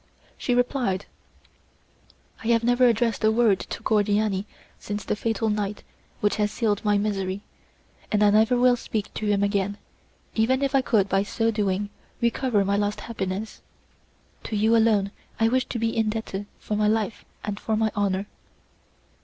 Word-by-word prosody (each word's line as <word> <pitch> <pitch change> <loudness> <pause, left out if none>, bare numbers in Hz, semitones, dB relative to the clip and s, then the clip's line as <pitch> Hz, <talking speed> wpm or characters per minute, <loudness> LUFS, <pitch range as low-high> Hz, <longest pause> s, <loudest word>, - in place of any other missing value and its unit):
She 245 - -1
replied: 245 -6 0 1.4
"I - - -4
have 230 -1 +3
never 245 +1 +4
addressed 230 -1 +1
a 220 - +5
word 220 -4 +3
to - - -7
Cordiani 205 -2 +1 0.3
since 205 0 -4
the - - -1
fatal 225 +1 -1
night 210 -1 -2 0.4
which 205 - +1
has 210 -1 +1
sealed 215 -3 0
my 210 -1 +3
misery, 195 -2 -1 0.7
and 210 0 +3
I 205 - +6
never 220 +4 +4
will 250 0 +5
speak 215 -3 -4
to 215 - -3
him 205 -1 +2
again, 200 0 0 0.6
even 260 +5 +2
if 275 0 0
I 270 - +4
could 215 -6 +2
by 195 0 +2
so 225 +3 0
doing 205 -1 -1 0.3
recover 235 -3 +1
my 200 +1 +1
lost 205 0 -1
happiness. 205 -1 -4 0.8
To 220 - -3
you 220 +2 +3
alone 215 -3 +3 0.3
I 225 0 +4
wish 255 +2 +1
to - - -4
be 225 0 -1
indebted 215 -2 -2
for 210 - -4
my 210 0 +2
life 215 0 0 0.2
and 205 -1 -4
for 220 -1 -1
my 220 0 +1
honour." 200 -1 0
215 Hz, 165 wpm, -25 LUFS, 205-230 Hz, 1.4 s, I